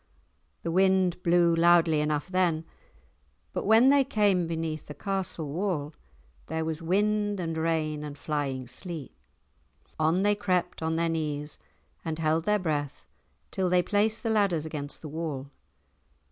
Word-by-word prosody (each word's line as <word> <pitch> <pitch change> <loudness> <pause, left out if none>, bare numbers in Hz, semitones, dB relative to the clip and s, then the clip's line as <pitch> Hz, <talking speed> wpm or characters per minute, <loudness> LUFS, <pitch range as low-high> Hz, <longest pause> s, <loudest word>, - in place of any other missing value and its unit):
The 165 - -2
wind 185 -1 +3
blew 170 -1 +4
loudly 170 -2 +5
enough 150 0 -1
then, 180 -4 +1 0.9
but - - -3
when 225 +4 +6
they 280 0 +5
came 205 -9 +2
beneath 160 -1 -3
the 150 - -8
castle 190 -6 -3
wall 165 -5 -2 0.5
there 160 +1 -2
was 160 0 -3
wind 205 +3 +1
and 165 -2 -2
rain 160 -2 -1
and 145 -1 -7
flying 140 -4 -2
sleet. 165 +2 -7 0.9
On 160 +5 +2
they 205 0 +4
crept 180 -4 -1
on 160 0 0
their 165 +1 +1
knees 150 -2 -3 0.4
and 160 -2 -3
held 160 0 +1
their 210 0 +3
breath 150 -6 -3 0.5
till 185 -1 0
they 180 0 +3
placed 215 +3 +1
the 225 - 0
ladders 195 -8 +2
against 150 -1 -5
the - - -5
wall. 145 -3 -5
165 Hz, 145 wpm, -28 LUFS, 155-190 Hz, 0.9 s, when